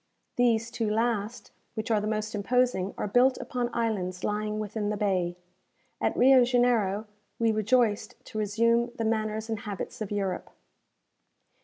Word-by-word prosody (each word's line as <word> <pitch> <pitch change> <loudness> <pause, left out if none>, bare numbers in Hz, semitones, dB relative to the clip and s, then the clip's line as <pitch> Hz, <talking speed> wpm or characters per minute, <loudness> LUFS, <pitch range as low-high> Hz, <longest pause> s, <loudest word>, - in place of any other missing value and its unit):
These 230 -2 +2
two 230 -2 -1
last, 225 0 -1 0.2
which 220 0 -3
are 215 -2 +3
the 210 - -2
most 215 0 -2
imposing, 210 -2 +1
are - - -2
built 250 +5 +3
upon 245 -1 -3
islands 190 -7 -2
lying 210 0 -1
within 210 0 -3
the 210 - -1
bay. 185 -4 0 0.6
At - - 0
Rio 260 0 +7
Janeiro 240 -5 +2 0.3
we 230 -1 +2
rejoiced 215 0 +1
to 215 - -5
resume 230 +3 +2
the 225 - -2
manners 220 0 -1
and 220 -2 -3
habits 205 +1 -6
of 210 - -3
Europe. 195 -3 -2
220 Hz, 150 wpm, -28 LUFS, 205-235 Hz, 0.6 s, Rio